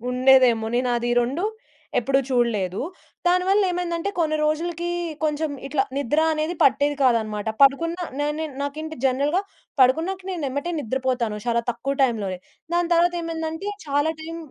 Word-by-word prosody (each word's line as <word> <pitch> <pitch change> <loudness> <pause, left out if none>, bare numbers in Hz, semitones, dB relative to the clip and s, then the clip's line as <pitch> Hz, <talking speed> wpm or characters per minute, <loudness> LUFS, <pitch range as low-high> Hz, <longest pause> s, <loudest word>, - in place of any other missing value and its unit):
ఉండేదేమో 250 -3 +5
నేనాది 240 -1 +1
ఈ 240 - +2
2 270 +9 -1 0.6
ఎప్పుడూ 270 +3 +2
చూడలేదు. 215 -7 +1 0.5
దానివళ్ళేమైందంటే 360 -1 +1
కొన్ని 310 -2 +1
రోజులుకి 335 +3 -1 0.4
కొంచెం 305 0 0 0.2
ఇట్ల 275 0 0 0.2
నిద్రా 295 +4 +1
అనేది 310 +2 -1
పట్టేది 285 +1 +3
కాదన్నమాట. 220 -4 +1
పడుకున్న 330 +5 +4 0.2
నా 290 - +1
నేన్ 315 -3 -4
నాకేంటి 310 +2 -5
జనరల్‌గా 285 +8 +1 0.4
పడుకున్నాక 330 +9 +3
నేనెమ్మటే 295 -1 -3
నిద్రపోతాను. 250 -3 -1
చాలా 235 0 +2
తక్కువ 250 +4 -3
టైంలోనే. 210 -7 0 0.4
దాని 345 0 +1
తర్వాత 350 +1 +3
ఏమైందంటే 325 +3 -4 0.2
చాలా 290 +3 +1
టైం 330 +1 -6
290 Hz, 130 wpm, -23 LUFS, 250-330 Hz, 0.6 s, ఉండేదేమో